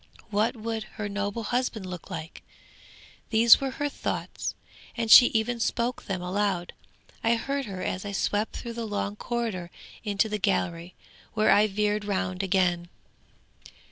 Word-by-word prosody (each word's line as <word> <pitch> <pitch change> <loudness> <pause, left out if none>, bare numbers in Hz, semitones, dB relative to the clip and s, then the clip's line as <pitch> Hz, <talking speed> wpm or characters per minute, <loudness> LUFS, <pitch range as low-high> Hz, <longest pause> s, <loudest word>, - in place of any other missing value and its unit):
What 215 +4 +1
would 225 -1 -4
her 210 - -2
noble 205 +2 -3
husband 240 -3 -1
look 180 -1 -8
like? 160 -3 -7 0.9
These 230 +2 +7
were 270 - -1
her 290 - 0
thoughts, 285 - -4 0.4
and 230 -1 0
she 245 - +11
even 235 +1 0
spoke 235 +1 -1
them 185 -2 -3
aloud; 185 -1 -1 0.5
I 230 +1 +4
heard 275 +4 -2
her 190 -3 -6
as 185 - -2
I 205 - -5
swept 205 +2 -1
through 235 - -6
the 230 -1 -4
long 205 -1 -2
corridor 220 -7 -3 0.3
into 205 0 +1
the 210 -1 -3
gallery, 180 -3 -1 0.4
where 215 0 +4
I 210 +1 +5
veered 210 +1 0
round 185 -2 -2
again. 180 -3 +1
210 Hz, 150 wpm, -27 LUFS, 190-230 Hz, 0.9 s, she